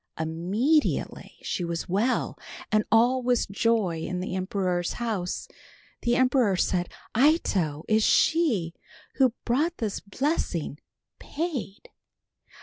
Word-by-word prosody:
Immediately 190 - 0
she 180 - -2
was 170 -1 -3
well 210 +8 0 0.4
and 215 0 +3
all 240 +4 +4
was 245 -1 +1
joy 200 -4 0
in 180 +3 -3
the 185 0 -4
emperor's 185 -2 -1
house. 215 -7 -3 0.5
The 240 0 +2
emperor 250 -6 +3
said, 180 -1 0 0.3
"Ito, 200 - +2
is 215 0 +3
she, 230 - +2 0.4
who 260 -3 +3
brought 305 +8 +1
this 215 -4 -2
blessing, 200 - -2 0.4
paid?" 290 - -5
215 Hz, 110 wpm, -26 LUFS, 180-255 Hz, 0.5 s, all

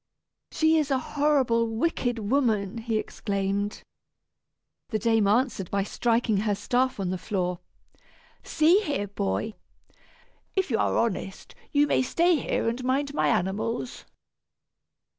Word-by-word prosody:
"She 315 0 +3
is 300 -2 -1
a 270 - +2
horrible 260 -5 +1
wicked 245 +1 -1
woman!" 220 -2 0
he 225 -1 -1
exclaimed. 200 -1 -2 1.1
The 215 - 0
dame 225 -1 +2
answered 215 -4 +1
by 200 -1 0
striking 230 0 +1
her 205 0 +1
staff 250 +4 0
on 185 -2 -1
the 185 - -3
floor. 180 -4 -2 0.8
"See 330 +5 +4
here, 285 - -2
boy, 205 +2 -2 1.0
if 380 -7 0
you 225 - +1
are - - +1
honest, 195 -4 -2 0.2
you 290 0 +4
may 290 - +2
stay 340 +7 +2
here 240 - -1
and 235 +2 -2
mind 275 +3 0
my - - +1
animals." 220 +4 -1
230 Hz, 130 wpm, -26 LUFS, 205-275 Hz, 1.1 s, See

